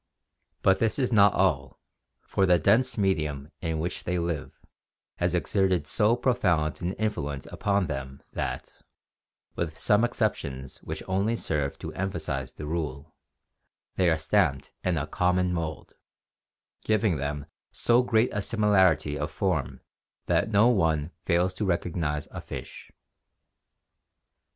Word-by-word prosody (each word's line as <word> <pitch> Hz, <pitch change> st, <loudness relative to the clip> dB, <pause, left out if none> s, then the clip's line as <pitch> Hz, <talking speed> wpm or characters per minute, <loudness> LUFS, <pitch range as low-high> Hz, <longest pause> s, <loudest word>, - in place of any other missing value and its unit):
But 95 Hz, 0 st, +4 dB
this 115 Hz, -1 st, +1 dB
is 130 Hz, -3 st, 0 dB
not 100 Hz, -3 st, +6 dB
all, -, -, +1 dB, 0.5 s
for 95 Hz, -, +1 dB
the 90 Hz, -1 st, +6 dB
dense 115 Hz, -, +3 dB
medium 75 Hz, -7 st, 0 dB
in 80 Hz, -2 st, -1 dB
which 85 Hz, +3 st, -3 dB
they 90 Hz, +1 st, -1 dB
live 85 Hz, -3 st, -3 dB, 0.6 s
has 90 Hz, 0 st, 0 dB
exerted 95 Hz, -2 st, +1 dB
so 105 Hz, +9 st, +2 dB
profound 90 Hz, -11 st, +1 dB
an 90 Hz, +2 st, -1 dB
influence 75 Hz, -11 st, -3 dB
upon 100 Hz, -1 st, +1 dB
them 70 Hz, -2 st, -6 dB
that, -, -, -4 dB, 0.7 s
with 80 Hz, -2 st, -3 dB
some 105 Hz, +6 st, +3 dB
excep 120 Hz, -3 st, +1 dB
tions 65 Hz, -2 st, -8 dB
which -, -, -6 dB
only 100 Hz, +5 st, +1 dB
serve 75 Hz, -9 st, -2 dB
to -, -, -7 dB
emphasize 75 Hz, -9 st, -3 dB
the 75 Hz, -, -7 dB
rule, 75 Hz, -2 st, -4 dB, 0.8 s
they 90 Hz, -2 st, +3 dB
are 80 Hz, -, +2 dB
stamped 80 Hz, -4 st, +1 dB
in 90 Hz, -3 st, +1 dB
a 75 Hz, -, -1 dB
common 90 Hz, +2 st, +1 dB
mould, 80 Hz, -2 st, -4 dB, 0.9 s
giving 110 Hz, -5 st, +2 dB
them 70 Hz, +1 st, -3 dB, 0.3 s
so 120 Hz, +1 st, +3 dB
great 115 Hz, -1 st, +2 dB
a 105 Hz, -, -1 dB
similarity 95 Hz, -9 st, +2 dB
of 75 Hz, -, -2 dB
form -, -, -1 dB, 0.4 s
that -, -, +1 dB
no 105 Hz, +2 st, +5 dB
one 80 Hz, -9 st, +2 dB
fails 90 Hz, +1 st, +2 dB
to 100 Hz, -, -4 dB
recognize 85 Hz, -5 st, -1 dB
a -, -, -6 dB
fish. -, -, -8 dB
90 Hz, 135 wpm, -27 LUFS, 75-100 Hz, 0.9 s, not